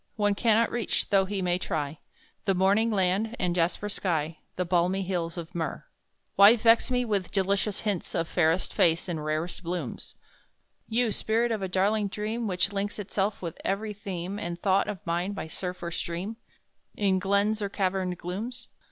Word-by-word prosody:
One 205 -2 +2
cannot 225 +2 +3
reach, 240 -2 -1
though 195 -1 +5
he 195 -1 -2
may 180 0 +1
try, 155 -5 -3 0.5
The 195 - +2
Morning 200 +5 +3
land, 205 +3 +1
and 180 -1 0
Jasper 175 +4 0
sky 165 -6 -1 0.2
The 180 - -1
balmy 180 +2 +2
hills 175 -2 -2
of 170 +1 -6
Myrrh. 160 -4 -3 0.5
"Why 200 +4 +9
vex 230 +1 +4
me 250 -1 +1
with 200 -5 -1
delicious 200 +1 0
hints 205 -5 -2
Of 165 -2 0
fairest 165 +1 +1
face, 170 -4 +3
and 160 -4 -3
rarest 155 +4 -2
blooms; 170 -7 -5 0.7
You 230 0 +2
Spirit 230 +3 +1
of 220 -3 -1
a 190 - -1
darling 200 +3 +2
Dream 215 +3 -3
Which 190 +1 +1
links 200 +1 -2
itself 200 -1 -2
with 165 -2 -5
every 210 +2 -1
theme 195 -1 -5
And 170 -2 -4
thought 195 +1 +2
of 205 -4 -5
mine 175 +4 -1
by 200 - -4
surf 180 +2 -5
or 170 - -3
stream, 175 +7 -4 0.6
In 195 -2 +2
glens 200 +3 +2
or 200 - -1
caverned 185 -2 -1
glooms?" 225 +9 -5
195 Hz, 175 wpm, -28 LUFS, 175-210 Hz, 0.7 s, Why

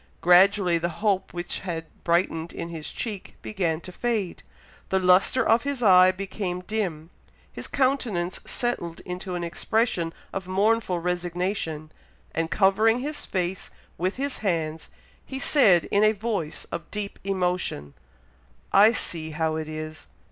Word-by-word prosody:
Gradually 180 0 +5
the 170 +1 -1
hope 195 +2 0
which 175 0 -4
had 165 -3 -4 0.2
brightened 170 -1 0
in 170 - -5
his 160 -3 -6
cheek 210 -5 -6
began 175 -6 -1
to 180 - -9
fade, 215 -3 -2 0.5
the 190 - +2
lustre 185 +7 +4
of 225 +2 +5
his 280 -3 -3
eye 185 -2 +7
became 185 -1 -4
dim, 180 -6 -3 0.4
his - - -5
countenance 240 -10 0
settled 175 -9 -2
into 180 0 -5
an 175 - -3
expression 170 0 0 0.2
of 190 -1 -4
mournful 200 0 +2
resignation, 175 -2 -2 0.4
and 165 0 -1
covering 215 +7 +3
his 290 +2 -5
face 185 -1 -2 0.3
with 185 +3 0
his 280 +1 -3
hands, 165 -6 -2 0.3
he 265 - -7
said, 220 - +5
in 200 +1 +4
a 215 0 +5
voice 205 -7 -3
of 170 - -5
deep 205 -1 -5
emotion, 180 - -1 0.8
"I 210 +4 +7
see 165 -7 -2
how 160 0 -1
it 155 0 -4
is! 155 0 -7
185 Hz, 140 wpm, -25 LUFS, 170-210 Hz, 0.8 s, eye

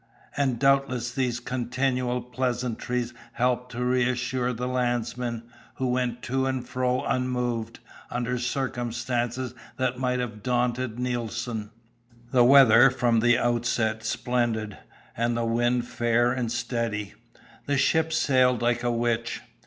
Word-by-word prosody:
And 135 -4 +1
doubtless 135 -2 +2
these 125 -3 -1
continual 125 0 -1
pleasantries 125 -1 -2 0.2
helped 125 0 0
to 125 +1 -2
reassure 125 0 0
the 125 +1 -3
landsmen, 120 -1 -1 0.3
who 130 -1 -1
went 125 -1 -1
to 130 +1 0
and 130 -2 -2
fro 125 0 0
unmoved, 125 -3 -1 0.3
under 125 +1 -2
circumstances 120 -1 -2 0.2
that 130 -1 -1
might 125 -1 0
have 115 -4 -4
daunted 125 0 0
Nelson. 120 -3 -3 0.6
The 125 -2 +5
weather 130 -1 +8
was 130 - -1
from 120 -2 +2
the 120 +1 +4
outset 115 -2 0
splendid, 115 -2 -1 0.4
and 115 +1 0
the 115 - 0
wind 120 +1 +1
fair 120 +1 +2
and 125 -3 -2
steady. 115 -4 -2 0.5
The 140 0 +1
ship 160 +4 +2
sailed 130 -5 +3
like 120 0 +2
a 120 - 0
witch. 120 0 -1
120 Hz, 130 wpm, -26 LUFS, 120-125 Hz, 0.6 s, weather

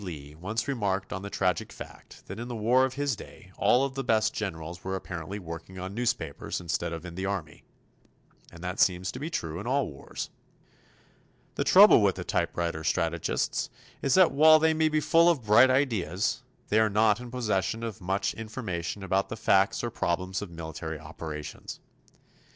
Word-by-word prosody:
Lee, 75 -6 -8
once 100 - -3
remarked 100 -8 -1
on 95 - -4
the 100 - -6
tragic 90 -4 -1
fact - - -12
that 100 - -8
in 120 - -5
the 120 - -5
war 120 +4 +3
of 130 - -5
his 140 -3 0
day 95 -2 -13
all 130 +3 +4
of 135 - -5
the 135 0 -3
best 110 -3 +2
generals 85 -3 -5
were 95 0 -2
apparently 95 0 -5
working 85 0 -8
on 95 +1 -5
newspapers 115 - -2
instead 85 -1 -2
of 85 +1 -6
in 85 - -7
the 95 +2 -3
Army. 85 -7 -4 0.9
And 85 0 -12
that 90 +2 -4
seems 90 0 +2
to 125 - -8
be 150 +4 -4
true 80 - -3
in 105 - -6
all 135 +2 +2
wars. 70 -2 -7 1.2
The - - -1
trouble - - +8
with - - +3
the - - -5
typewriter 85 -2 -1
strategists 85 0 -1 0.3
is 135 - +2
that 185 -2 +6
while 155 +3 +7
they 160 +1 +3
may 155 0 +2
be 155 0 +1
full 165 +3 +5
of 155 -8 +1
bright 120 +5 +7
ideas, 110 - 0 0.3
they 110 - +4
are 110 -1 +4
not 105 +1 +3
in 125 0 -8
possession 115 -2 -1
of 115 -4 -5
much 95 +2 -1
information 105 -5 -5
about 95 +1 0
the 110 - -5
facts 100 -1 +2
or 120 - -2
problems 95 -2 -2
of 105 - -6
military 80 -1 -6
operations. 80 -1 -8
100 Hz, 185 wpm, -28 LUFS, 85-120 Hz, 1.2 s, trouble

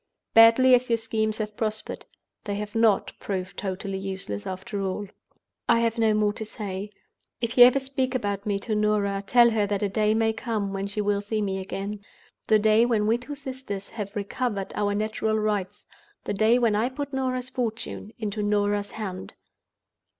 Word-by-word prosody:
Badly 230 +3 +7
as 250 0 +4
your 230 - +3
schemes 220 -1 -1
have 210 -1 -4
prospered, 215 -1 -3 0.4
they 205 -2 -2
have 210 0 -5
not 225 -3 +3
proved 185 -1 -4
totally 195 0 -4
useless 190 - -5
after 195 +3 -4
all! 195 +2 -2 0.6
"I 230 -1 +5
have 230 0 0
no 220 -1 +3
more 210 -1 +2
to 220 - -4
say. 205 -2 -5 0.5
If 235 -1 -2
you 245 - +10
ever 255 +2 +5
speak 265 -1 -2
about 205 -4 -2
me 200 -1 +1
to 220 - -3
Norah, 210 -2 +1
tell 235 +3 +5
her 215 -2 +1
that 205 0 -1
a 205 - +1
day 215 +2 +2
may 225 0 +2
come 215 -4 -3
when 195 0 -2
she 205 +1 -3
will 205 -1 +1
see 215 +1 -2
me 195 -2 -1
again—the 200 +2 -3
day 215 +1 +4
when 225 -3 +2
we 225 +3 +2
two 290 +4 -7
sisters 260 -8 -6
have 205 -3 -6
recovered 205 0 -2
our 205 -1 0
natural 215 +1 0
rights; 205 -3 -2 0.4
the - - -2
day 220 +4 +4
when 235 -3 +2
I 225 +4 +1
put 280 +1 -6
Norah's 255 -1 -2
fortune 225 -4 -4
into 210 -1 -3
Norah's 205 0 +1
hand. 190 -4 -6
215 Hz, 180 wpm, -26 LUFS, 200-230 Hz, 0.6 s, you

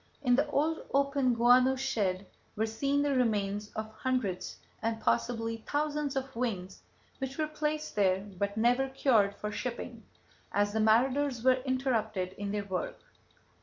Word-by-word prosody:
In 245 -2 +4
the 285 +4 +2
old 310 +3 +1 0.2
open 275 -3 +2
guano 250 +3 +5
shed 205 -8 -1 0.3
were 220 - +1
seen 275 +6 0
the 290 -1 +1
remains 210 -4 0
of 220 0 -5
hundreds 240 -8 -2 0.2
and 225 0 -1
possibly 230 0 0
thousands 290 +3 -2
of 270 -1 -3
wings 195 -6 -3 0.4
which 265 0 -4
were 310 - +1
placed 305 0 -3
there 190 -2 +3 0.2
but 200 +1 -1
never 245 +4 +3
cured 225 -7 +3
for 210 - -4
shipping, 235 +1 -5 0.5
as 205 0 +1
the 220 - 0
marauders 250 +3 +2
were 255 0 +4
interrupted 220 -8 0
in 200 +1 -5
their 205 -1 -2
work. - - -3
240 Hz, 150 wpm, -30 LUFS, 210-270 Hz, 0.5 s, guano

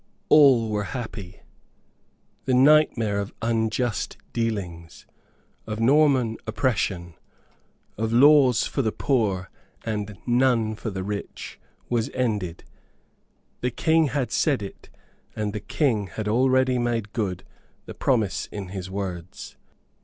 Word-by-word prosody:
All 130 -7 +6
were 105 -1 -1
happy 105 -5 -8 1.0
the 130 - +2
nightmare 130 -7 +4
of 100 0 -5
unjust 115 +1 -1 0.2
dealings, 95 -8 -4 0.6
of 110 0 -4
Norman 130 -2 +3
oppression, 100 -7 -1 0.9
of 110 0 -1
laws 130 -1 +5
for 140 - -1
the 110 -4 0
poor 105 -10 -1 0.3
and 105 -2 -4
none 120 -3 +2
for 110 +1 -5
the 95 -2 -4
rich, 100 +1 -6 0.3
was 120 -2 0
ended. 105 -9 -2 1.0
The 125 - 0
King 160 +5 +2
had 135 -2 -2
said 140 -9 +1
it, 100 - -10 0.5
and 105 -2 -2
the 105 - -3
King 110 -6 0
had 105 +2 -5
already 130 +2 +2
made 115 -3 -2
good 100 -6 -2 0.4
the - - -8
promise 110 -7 0
in 100 -3 -7
his 95 -1 -6
words. 95 -3 -6
110 Hz, 120 wpm, -24 LUFS, 100-130 Hz, 1.0 s, All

